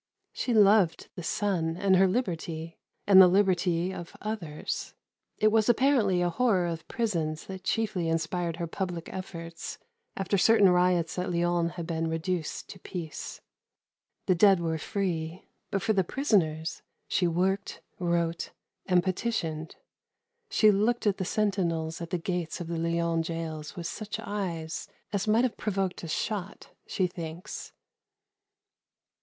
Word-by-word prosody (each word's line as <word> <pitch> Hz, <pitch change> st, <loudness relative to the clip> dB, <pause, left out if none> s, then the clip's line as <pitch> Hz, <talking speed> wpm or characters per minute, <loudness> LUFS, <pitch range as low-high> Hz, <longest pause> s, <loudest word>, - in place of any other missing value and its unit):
She 250 Hz, -, -2 dB
loved 205 Hz, -5 st, +4 dB
the -, -, -7 dB
sun 170 Hz, -2 st, -1 dB
and 190 Hz, 0 st, +3 dB
her 190 Hz, +1 st, +6 dB
liberty, 165 Hz, -6 st, -3 dB, 0.3 s
and 195 Hz, -2 st, +9 dB
the 185 Hz, -, +9 dB
liberty 180 Hz, -2 st, +2 dB
of 170 Hz, -2 st, -8 dB
others. 185 Hz, -9 st, -4 dB, 0.4 s
It 215 Hz, -, +4 dB
was 220 Hz, +1 st, +3 dB
apparently 235 Hz, -8 st, +3 dB
a 175 Hz, -, +2 dB
horror 200 Hz, -3 st, +2 dB
of 165 Hz, -1 st, -4 dB
prisons 165 Hz, -9 st, -1 dB
that 190 Hz, -1 st, -8 dB
chiefly 200 Hz, -6 st, 0 dB
inspired 165 Hz, +1 st, -1 dB
her 170 Hz, 0 st, -3 dB
public 175 Hz, 0 st, -4 dB
efforts 170 Hz, -3 st, -6 dB, 0.4 s
after 195 Hz, +1 st, +1 dB
certain 200 Hz, -2 st, +6 dB
riots 180 Hz, -1 st, +2 dB
at 180 Hz, 0 st, -2 dB
Lyons 170 Hz, -1 st, +1 dB
had 170 Hz, -2 st, -5 dB
been 165 Hz, -1 st, -1 dB
reduced 165 Hz, 0 st, -2 dB
to 190 Hz, -, -9 dB
peace. 170 Hz, -4 st, -6 dB, 0.8 s
The 185 Hz, -, +4 dB
dead 195 Hz, +1 st, +6 dB
were 165 Hz, -1 st, -1 dB
free, 170 Hz, -2 st, -3 dB, 0.2 s
but 195 Hz, -1 st, -1 dB
for 220 Hz, -, +2 dB
the 195 Hz, -2 st, +3 dB
prisoners 170 Hz, -, 0 dB, 0.3 s
she 180 Hz, -, +2 dB
worked, 190 Hz, +4 st, 0 dB, 0.2 s
wrote, 170 Hz, -1 st, 0 dB, 0.4 s
and 180 Hz, -2 st, +4 dB
petitioned. 175 Hz, -6 st, -2 dB, 0.7 s
She 215 Hz, -, +5 dB
looked 220 Hz, +4 st, +1 dB
at 205 Hz, -2 st, +2 dB
the 190 Hz, -, -2 dB
sentinels 175 Hz, -6 st, 0 dB
at 170 Hz, -, -5 dB
the 180 Hz, -, 0 dB
gates 175 Hz, -1 st, -3 dB
of 175 Hz, -, -4 dB
the 165 Hz, 0 st, -3 dB
Lyons 170 Hz, 0 st, 0 dB
gaols 160 Hz, -2 st, -5 dB
with 175 Hz, -3 st, -6 dB
such 215 Hz, +3 st, -4 dB
eyes 170 Hz, -6 st, -4 dB, 0.3 s
as 200 Hz, +1 st, 0 dB
might 220 Hz, +3 st, +4 dB
have 255 Hz, -, 0 dB
provoked 195 Hz, -3 st, -1 dB
a -, -, -4 dB
shot, 195 Hz, +4 st, -3 dB, 0.2 s
she 185 Hz, -, +1 dB
thinks. 170 Hz, -1 st, -6 dB
180 Hz, 145 wpm, -28 LUFS, 165-200 Hz, 0.8 s, and